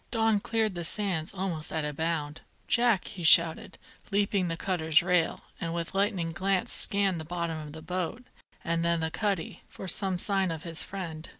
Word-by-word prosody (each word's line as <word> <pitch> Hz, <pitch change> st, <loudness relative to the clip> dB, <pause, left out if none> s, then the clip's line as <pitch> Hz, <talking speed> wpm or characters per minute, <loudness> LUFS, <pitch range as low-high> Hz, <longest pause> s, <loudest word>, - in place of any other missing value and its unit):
Don 225 Hz, -2 st, +2 dB
cleared 225 Hz, -1 st, 0 dB
the 175 Hz, -1 st, -4 dB
sands 175 Hz, -3 st, 0 dB
almost 180 Hz, -5 st, -4 dB
at 160 Hz, -2 st, -1 dB
a 150 Hz, -, -3 dB
bound. 160 Hz, -1 st, -2 dB, 0.3 s
"Jack!" 235 Hz, -5 st, +3 dB
he 195 Hz, -4 st, -8 dB
shouted, 165 Hz, 0 st, +5 dB, 0.3 s
leaping 200 Hz, -2 st, +1 dB
the 165 Hz, -1 st, -3 dB
cutter's 165 Hz, -3 st, +2 dB
rail, 180 Hz, -2 st, +1 dB, 0.2 s
and 165 Hz, 0 st, -3 dB
with 170 Hz, -1 st, -4 dB
lightning 195 Hz, -4 st, 0 dB
glance 190 Hz, +2 st, 0 dB
scanning 195 Hz, -3 st, +4 dB
the -, -, -5 dB
bottom 170 Hz, -1 st, -3 dB
of 150 Hz, -1 st, -8 dB
the 160 Hz, 0 st, -9 dB
boat, 185 Hz, +7 st, -3 dB, 0.4 s
and 170 Hz, -1 st, 0 dB
then 170 Hz, 0 st, +2 dB
the 160 Hz, 0 st, -2 dB
cuddy, 200 Hz, -5 st, -2 dB
for 190 Hz, -, -9 dB
some 190 Hz, +1 st, +1 dB
sign 195 Hz, 0 st, 0 dB
of 165 Hz, -1 st, -5 dB
his 165 Hz, -2 st, -2 dB
friend. 165 Hz, -5 st, -7 dB
175 Hz, 185 wpm, -28 LUFS, 165-195 Hz, 0.4 s, shouted